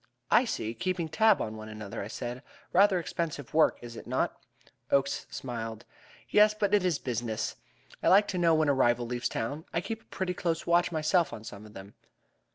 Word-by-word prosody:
"I 255 - +6
see. 115 - -3
Keeping 180 +1 -2
tab 220 +4 +4
on 110 0 -5
one 110 0 -8
another!" 110 0 -6
I 100 - -5
said. 120 +3 -5 0.3
"Rather 195 +1 +5
expensive 160 -6 -4
work, 160 0 +4
is 120 -1 -8
it - - -9
not?" - - 0 0.5
Oakes 140 0 +1
smiled. 115 -3 -6 0.4
"Yes, 210 0 +5
but 205 -2 0
it 205 -2 +4
is 180 -5 +1
business. 115 -3 -3 0.5
I - - 0
like 200 +2 +6
to 180 - -1
know 165 -2 +4
when 155 -1 +2
a 140 - +4
rival 120 -2 +2
leaves 120 +1 -2
town. 140 +8 -3
I - - 0
keep 225 +5 -5
a - - -29
pretty 185 -2 -3
close 170 -2 -2
watch 175 +1 +3
myself 160 +2 +2
on 110 -2 -8
some 105 -1 -9
of 105 - -16
them." 95 +1 -10
145 Hz, 200 wpm, -29 LUFS, 115-180 Hz, 0.5 s, I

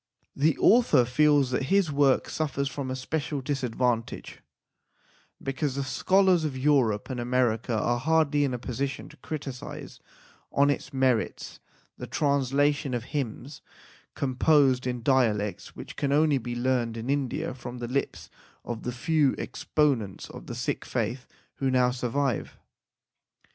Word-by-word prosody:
The 150 +2 +2
author 210 - +5
feels 145 +1 +3
that 130 +1 0
his 190 -1 +2
work 140 -2 +3
suffers 140 -3 -2
from 140 -1 -5
a 130 - -2
special 145 +2 -3
disadvantage, 125 -4 -2 1.0
because 135 0 -2
the 140 - -1
scholars 185 +5 +3
of 145 -4 -2
Europe 130 -6 +2
and 125 - -4
America 120 -2 0
are 120 +3 0
hardly 150 0 +2
in 140 - 0
a 125 - -2
position 130 +3 -4
to 150 - -16
criticize 135 -2 -7 0.5
on 140 +1 +4
its 140 - -4
merits 130 -4 0 0.4
the - - -6
translation 140 -1 +1
of 120 - -3
hymns 135 0 -4 0.5
composed 130 -1 +3
in 125 -2 -3
dialects 110 -6 +1
which - - -9
can 140 - -1
only 150 -1 +3
be 120 0 -5
learned 120 -2 0
in 115 +2 -5
India 135 -2 -1
from 125 -1 -8
the 120 -1 -5
lips 135 +3 -3 0.3
of 120 -2 -5
the 125 - -3
few 145 +3 +1
exponents 130 -11 -1
of - - -11
the - - -5
Sikh - - -2
faith 125 +1 -3 0.3
who 135 - 0
now 125 -1 +3
survive. 125 0 -2
130 Hz, 145 wpm, -27 LUFS, 125-145 Hz, 1.0 s, author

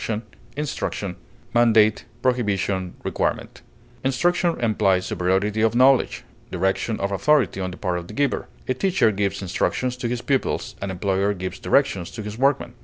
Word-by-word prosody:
direction, 110 0 -2 0.3
instruction, 105 -10 -3 1.1
prohibition, 100 -7 0 1.1
Instruction 170 +6 +1
implies 100 -5 +2
superiority 95 +4 0
of 115 +1 +2
knowledge, 130 +1 +4 0.3
direction 95 +5 -1
of 100 0 -1
authority 105 - +2
on 95 - -2
the 90 - -9
part 90 -3 -1
of 85 - -10
the 105 - -10
giver; 140 0 0 0.2
a 130 - +2
teacher 180 - +2
gives 100 -1 -2
instructions 125 +7 -1
to 125 -1 -3
his 120 0 -3
pupils, 135 -2 -1
an 100 - -3
employer 95 +2 0
gives 95 0 -5
directions 100 -11 +1
to 110 - -7
his 105 0 -6
workmen. 135 -1 +1
105 Hz, 145 wpm, -23 LUFS, 95-130 Hz, 1.1 s, knowledge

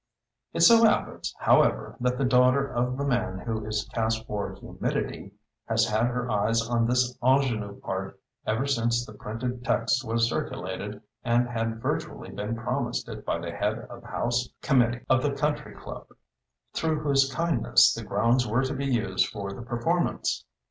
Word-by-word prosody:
It - - -2
so 230 -1 +8
happens, 220 - +2
however, - - +3
that 125 0 0
the 135 - +1
daughter 125 +2 +4
of 125 0 -1
the 140 - -1
man 115 -8 0
who 110 +1 -3
is 110 -1 -2
cast 110 -1 0
for 105 -2 -3
Humidity 100 - -4 0.4
has 115 0 +3
had 110 +2 +2
her 125 0 -2
eyes 115 +1 +1
on 115 -1 +2
this 125 0 +2
ingénue 120 -6 +1
part - - -4 0.3
ever 110 +5 +1
since 120 -3 +1
the 110 - -11
printed 120 +4 -5
text 115 +2 +1
was 115 0 +1
circulated - - -4 0.2
and 120 +1 +2
had 115 -1 -3
virtually - - -3
been 105 +3 -3
promised 115 +1 -2
it - - -7
by - - -1
the - - -5
Head - - -1
of - - -9
the - - -14
House 120 +1 -1
Committee 120 -4 +2
of 130 0 +4
the 140 +1 0
Country 150 +1 -2
Club, - - -9 0.7
through 160 -2 0
whose 135 -2 +3
kindness 165 -3 +4
the - - -5
grounds 120 +2 +2
were 115 +5 +1
to 135 +2 -1
be 140 0 -2
used 115 -7 +1
for 100 -1 -5
the 100 - -8
performance. 120 - -1
120 Hz, 170 wpm, -27 LUFS, 115-130 Hz, 0.7 s, so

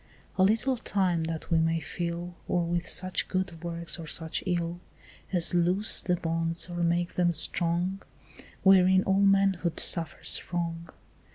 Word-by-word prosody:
A - - 0
little 225 +7 +2
time 185 -7 0
that 165 +1 -6
we 165 - +4
may 165 0 +1
fill 170 +1 -5
Or 175 -1 0
with 175 0 -2
such 185 0 0
good 185 -3 -3
works 170 0 -5
or 165 - -8
such 160 +1 -2
ill 175 -1 -2 0.5
As 175 -3 +1
loose 180 +4 +3
the 180 - 0
bonds 165 +1 -3
or 175 - -6
make 170 +1 0
them 175 -1 +1
strong 175 +4 +1 0.6
Wherein 190 -1 +5
all 195 +1 +1
manhood 195 -3 +2
suffers 165 -2 +2
wrong. 170 -1 -3
175 Hz, 150 wpm, -28 LUFS, 170-185 Hz, 0.6 s, Wherein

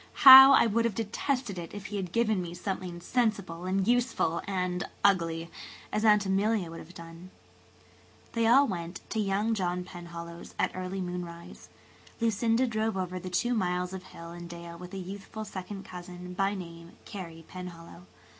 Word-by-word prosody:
How 265 +1 +13
I - - +6
would 230 +1 +1
have 230 -4 -1
detested 225 -1 -2
it 170 +3 -8
if 205 -1 -7
he - - -1
had 185 -3 -4
given 220 -3 +1
me 175 -1 -6
something 180 -2 -5
sensible 200 -6 -1
and 190 +1 0
useful 240 -8 +1
and 180 -2 -1 0.2
ugly–as 170 +2 -1
Aunt 210 -2 +5
Emilia 195 -2 +1
would 165 - -8
have 175 +3 -13
done." 170 +2 -11 1.0
They 230 -1 +2
all 265 +5 +6
went 175 -2 -5
to 220 - -1
"young" 205 +2 +1
John 180 -3 -1
Penhallow's 170 -1 -9
at - - +1
early 185 +1 -4
moonrise. 175 -1 -7 0.5
Lucinda 230 +2 +2
drove 220 -3 -1
over 185 -1 -3
the 185 - -6
two 240 +7 0
miles 180 -3 -1
of 185 -1 -7
hill 170 0 -10
and 175 0 -9
dale 170 0 -8
with 180 +3 -9
a - - -4
youthful 195 +3 -7
second 195 0 -7
cousin, 180 0 -9
by 195 +2 0
name, 170 -2 -9
Carey 165 -6 -8
Penhallow. 170 - -10
185 Hz, 165 wpm, -29 LUFS, 175-215 Hz, 1.0 s, How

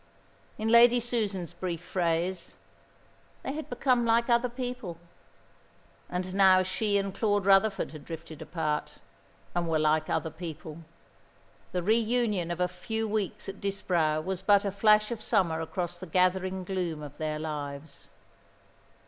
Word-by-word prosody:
In 220 +1 -1
Lady 235 +1 +7
Susan's 210 -8 -2
brief 175 -3 -4
phrase, 170 +1 -1 0.9
"They - - -3
had 310 +1 -6
become 250 -1 +2
like 235 +1 +2
other 235 +1 +3
people." 245 -8 -5 1.1
And 185 +1 -3
now 190 -1 +6
she 200 +2 0
and 195 -1 -1
Claude 205 -1 +1
Rutherford 195 +1 +3
had 155 -2 -10
drifted 165 -1 -8
apart, 155 -2 -2 0.6
and 175 -1 -1
were 160 - +2
like 155 0 +2
other 160 - -1
people. 160 -1 -8 0.9
The 180 -1 -2
reunion 220 -3 +1
of 175 0 -3
a 180 - +2
few 220 +5 -3
weeks 210 -3 -2
at 195 0 -7
Disbrowe 170 -6 0
was 185 +2 -3
but 200 +1 +4
a 200 - 0
flash 210 +2 +4
of 230 -2 -4
summer 165 -6 +1
across 175 +1 -4
the 185 - -8
gathering 185 +2 +1
gloom 175 -5 -3
of 145 0 -10
their 155 -1 -2
lives. 145 -1 -6
185 Hz, 145 wpm, -29 LUFS, 165-215 Hz, 1.1 s, Lady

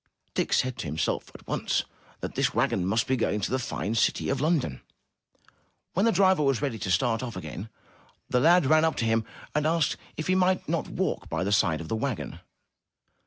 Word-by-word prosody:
Dick - - -1
said 130 -1 +1
to - - -3
himself 75 +2 -1
at - - -13
once - - 0 0.4
that - - -4
this - - 0
wagon 90 -2 +1
must 110 +4 +2
be 130 - +1
going 110 -3 0
to 100 - -2
the 130 - +1
fine 110 -3 -3
city 115 - +1
of 135 -1 0
London. 150 - 0 1.1
When 195 +6 +2
the - - +5
driver 190 -3 +4
was 135 -4 +2
ready 135 -6 -2
to 95 - -3
start 110 +6 +2
off 120 -3 -5
again, 90 +4 -6 0.6
the 125 - +2
lad 170 +4 +5
ran 155 +3 +5
up 160 - +2
to 115 - -1
him 115 0 +1 0.3
and 150 +1 +1
asked 165 -1 +1 0.2
if 155 - -3
he 185 - +2
might 185 0 +2
not - - -1
walk - - -2
by - - -1
the 100 - -1
side 90 -6 +2
of 80 - -7
the 110 - -1
wagon. 120 +1 -3
125 Hz, 210 wpm, -27 LUFS, 105-155 Hz, 1.1 s, the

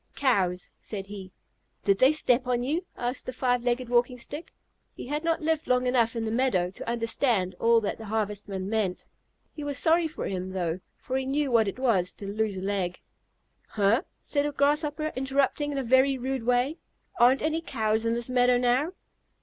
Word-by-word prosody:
"Cows," 185 -9 +1
said 200 -3 -6
he. 195 -2 -9 0.5
"Did 200 -1 +2
they 260 +2 +6
step 255 -5 +1
on 245 -1 +1
you?" 310 +8 -1
asked 245 +2 -3
the - - -2
Five 245 -1 +1
Legged 245 0 0
Walking 245 +1 +2
Stick. 290 +6 -8 0.4
He - - -7
had 295 +4 -3
not 330 -1 0
lived 320 0 0
long 250 0 +2
enough 240 -2 +2
in 230 -1 -2
the 220 - -2
meadow 220 -8 +1
to 195 - -7
understand 230 -4 0
all 230 0 +5
that 210 - -3
the 220 - -8
Harvestman 205 -3 -3
meant. 205 -4 -1 0.5
He 300 - -7
was 285 -1 -3
sorry 330 +1 +3
for 315 - -6
him, 185 0 -4
though, 175 -2 -2 0.2
for 260 - -3
he 265 - -2
knew 280 0 0
what 225 -3 +4
it 195 - -3
was 215 -9 +1
to 200 - -9
lose 205 0 -1
a - - -4
leg. 190 -2 -2 0.7
"Huh!" 210 +4 +2 0.2
said 290 -1 0
a - - -2
Grasshopper, 295 +2 0
interrupting 275 +2 0
in 280 - -3
a 270 - -1
very 260 +2 +4
rude 260 -1 -3
way, 250 +6 +2 0.4
"aren't 250 +3 +5
any 315 +1 0
Cows 220 -7 0
in 230 0 +1
this 235 0 -3
meadow 250 -1 +3
now!" 250 +7 +1
245 Hz, 195 wpm, -27 LUFS, 210-275 Hz, 0.7 s, they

